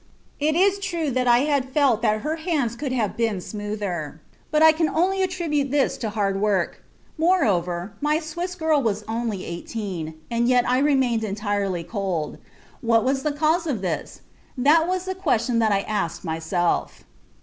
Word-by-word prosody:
It 305 +2 +1
is 390 +3 +3
true 340 -7 -2
that 250 0 0
I 240 0 +5
had 280 -3 0
felt 265 -5 +2
that 215 -2 +1
her 310 +6 -2
hands 310 -9 -1
could 270 +2 -4
have 230 -5 -1
been 225 -4 0
smoother, 200 -7 -4 0.3
but 310 0 +3
I 320 - +9
could 320 0 +1
only 375 +5 +1
attribute 335 -7 0
this 280 0 +1
to 225 - -3
hard 200 -2 -1
work; 200 -4 0 0.4
moreover, 200 - +1
my 300 +1 +2
Swiss 345 +3 -4
girl 320 -4 +2
was 215 -4 -1
only 225 -4 -3
eighteen, 170 -2 -5 0.2
and 235 0 +1
yet 250 -1 +3
I 250 +1 +3
remained 265 -5 +2
entirely 200 -3 -2
cold. 190 -6 -3 0.4
What 230 -2 +3
was 265 +1 +1
the 300 - 0
cause 315 +3 +1
of 235 -10 -2
this? 175 -4 -4 0.4
That 305 +6 +4
was 370 0 -1
the 375 - -2
question 245 - 0
that 220 -2 +3
I 195 -1 +2
asked 170 -6 -3
myself." 165 +2 -1
240 Hz, 170 wpm, -23 LUFS, 205-310 Hz, 0.4 s, I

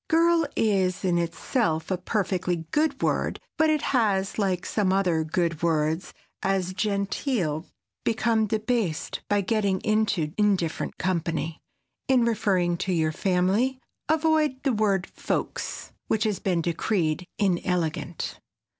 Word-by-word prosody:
"Girl" 330 -1 +4
is 190 -4 +1
in 175 -2 +2
itself 170 0 -1
a 185 - +1
perfectly 180 -4 -1
good 300 -2 +1
word - - 0 0.2
but 315 0 +3
it 305 -2 +1
has, 205 -5 +1
like 185 -3 0
some 200 -3 +1
other 180 -4 +2
good 165 0 -1
words 160 +1 0 0.3
as 190 -1 0
"genteel," 200 - -1 0.4
become 220 -1 +2
debased 215 -6 -1
by 205 0 +3
getting 200 -2 +1
into 210 -8 +1
indifferent 195 -6 +1
company. 165 -3 -1 0.5
In 255 -3 +4
referring 185 -6 +1
to 190 - -2
your 160 -3 +2
family 195 +9 +1 0.3
avoid 310 -4 +2
the 270 -3 +2
word 200 -4 +1
"folks" - - -4 0.2
which 220 -1 +1
has 210 -4 0
been 180 -4 0
decreed 170 0 0
inelegant. 175 -3 -1
195 Hz, 125 wpm, -26 LUFS, 175-220 Hz, 0.5 s, Girl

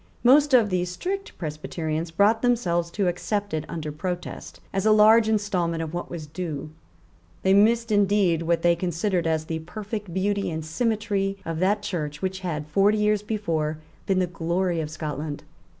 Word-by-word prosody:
Most 280 +2 +6
of 220 -5 +4
the 180 -1 +1
strict 375 - -4
Presbyterians 155 +1 -3
brought 205 +7 +3
themselves 180 -9 +1
to 195 +2 -1
accept 205 +3 -2
it 155 -1 -2
under 155 -3 -4
protest, 175 +4 -5
as 195 -1 0
a 220 - +4
large 215 +1 +6
instalment 180 -6 0
of 160 0 -6
what 175 - -4
was 165 -3 -6
due. 155 -2 -5 0.7
They 190 - +4
missed 225 +3 +4
indeed 200 -5 +3
what 165 0 0
they 170 0 +5
considered 175 0 -1
as 160 -1 0
the 160 0 -3
perfect 205 +3 -6
beauty 200 +3 0
and 160 -1 -4
symmetry 200 +1 -1
of 165 -1 -3
that 205 +3 +1
Church 150 -6 -3
which 190 +1 -3
had, 160 -5 -3
forty 195 +7 +3
years 210 -1 +2
before, 165 -8 -2 0.3
been 195 - +2
the 185 - +3
glory 175 0 -1
of 150 - -4
Scotland. 150 -1 -5
180 Hz, 170 wpm, -25 LUFS, 165-210 Hz, 0.7 s, Most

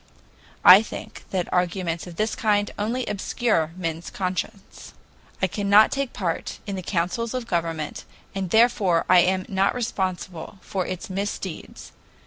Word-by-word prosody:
I 185 +3 +11
think 225 - -9
that 185 -2 -2
arguments 180 -1 -1
of 175 - -9
this 215 +4 0
kind 205 -2 +1
only 235 +4 -1
obscure 205 -4 0
men's 165 -2 -4
conscience. 190 +1 -5 0.5
I - - +7
cannot 200 +3 +4
take 275 -2 -2
part 170 -4 -3
in 200 - -4
the 185 - -4
councils 185 +7 -2
of 250 -2 -3
government, 165 -5 -3 0.3
and 195 -2 -3
therefore 210 -6 +3
I 180 0 +7
am 185 +1 +2
not 195 +2 +1
responsible 185 -6 -3
for 190 -3 -3
its 185 -1 -5
misdeeds.. 195 -3 -5
190 Hz, 140 wpm, -24 LUFS, 175-210 Hz, 0.5 s, I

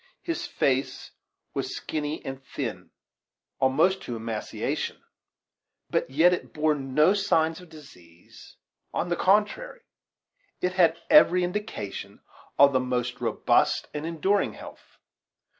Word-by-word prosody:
His 335 -1 -3
face 135 0 -1 0.4
was - - -3
skinny 150 0 -4
and 135 0 -6
thin - - -5 0.7
al 130 - +5
most 180 +8 +2
to 120 - -5
emaciation; 110 -1 -4 0.9
but - - 0
yet 160 +7 +4
it 180 - -5
bore 155 0 +2
no 145 +5 +2
signs 165 -5 +1
of 180 - -15
disease 90 - -16 0.4
on 175 - -1
the 175 - +1
contrary, 210 - +1 0.8
it 180 0 -1
had 170 -3 +4
every 180 - +7
indication 175 - -5 0.4
of 140 0 +6
the 130 - +3
most 125 -1 -2
robust 115 -3 +1
and 150 +2 -4
enduring 190 +5 0
health. - - -13
155 Hz, 125 wpm, -26 LUFS, 130-180 Hz, 0.9 s, every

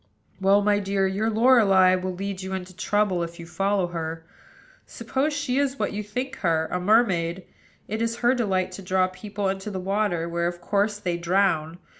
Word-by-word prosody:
"Well, 200 +1 +4
my 205 0 +3
dear, 195 -1 0
your 200 +4 0
Lorelei 215 -5 +5
will 185 0 -2
lead 195 0 -4
you 190 0 -5
into 185 -1 -6
trouble, 205 -2 0
if 170 +1 -5
you 170 - -8
follow 195 +3 0
her. 165 -1 -5 0.6
Suppose 275 +3 -2
she 285 -3 -1
is 275 -1 0
what - - -2
you 210 - -3
think 250 +6 -5
her, 160 -3 +1
a 180 - -1
mermaid: 185 -4 +2 0.4
it 215 +2 -3
is 230 0 0
her 240 +1 +2
delight 190 -7 0
to 185 - -8
draw 185 0 +2
people 200 +2 -4
into 190 +2 -3
the 190 -2 -4
water, 190 -3 -1
where, 170 0 -1
of 175 0 -4
course, 205 +3 0
they 175 -4 -2
drown. 170 -2 +1
195 Hz, 190 wpm, -25 LUFS, 180-210 Hz, 0.6 s, Lorelei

